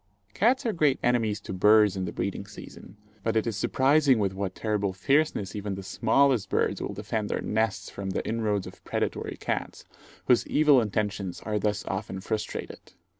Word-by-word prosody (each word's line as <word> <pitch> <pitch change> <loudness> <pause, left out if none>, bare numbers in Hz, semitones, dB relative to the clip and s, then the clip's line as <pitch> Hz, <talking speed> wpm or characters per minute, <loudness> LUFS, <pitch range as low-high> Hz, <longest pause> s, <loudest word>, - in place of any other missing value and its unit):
Cats 260 +1 +2
are 225 - +1
great 150 -5 +2
enemies 115 -4 +1
to 95 - -6
birds 105 +1 +5
in 95 -1 -2
the - - -4
breeding - - -4
season; 95 - -12 0.2
but 115 +2 -1
it 110 - +2
is 115 -3 -2
surprising 135 +5 +3
with 100 -3 0
what 95 -1 -4
terrible 105 -3 -1
fierceness 135 -3 +1
even 100 -1 -3
the 95 - -7
smallest 120 +4 +2
birds - - 0
will 100 - -4
defend 105 +1 -3
their - - -1
nests 105 -3 -1
from 100 -1 -5
the 95 - -3
inroads 110 -3 -1
of - - -12
predatory - - -3
cats, - - -4 0.4
whose 125 - +3
evil 145 -4 +5
intentions 105 -3 -2
are 105 -1 -2
thus 105 0 -1
often 95 0 -4
frustrated. 110 +2 -5
105 Hz, 175 wpm, -27 LUFS, 100-120 Hz, 0.4 s, birds